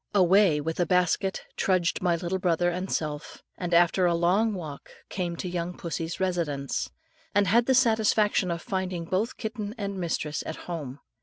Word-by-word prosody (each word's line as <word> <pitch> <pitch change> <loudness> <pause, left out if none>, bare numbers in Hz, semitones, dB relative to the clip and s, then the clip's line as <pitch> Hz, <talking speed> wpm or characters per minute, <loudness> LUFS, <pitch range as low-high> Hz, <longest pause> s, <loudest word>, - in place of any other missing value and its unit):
Away 190 -3 +5
with 160 +3 -3
a 175 - +2
basket 180 +2 +1
trudged 185 -2 +1
my 175 -2 +2
little 175 +2 -2
brother 175 -1 +2
and 185 +2 -4
self, 150 -2 -4
and 180 -1 -4
after 175 +2 +4
a 170 - +2
long 195 +6 +2
walk 155 -6 -8 0.2
came 175 -3 -3
to 180 - -5
young 175 0 -3
pussy's 165 0 -4
residence, 165 -7 -1 0.5
and 205 0 +4
had 230 +5 +3
the 265 - +4
satisfaction 220 -5 +3
of 170 0 -3
finding 185 -3 -3
both 195 +7 -1
kitten 220 -1 -5
and 200 -2 -4
mistress 155 -4 -2
at 160 - -4
home. 145 -6 -6
180 Hz, 170 wpm, -27 LUFS, 170-195 Hz, 0.5 s, Away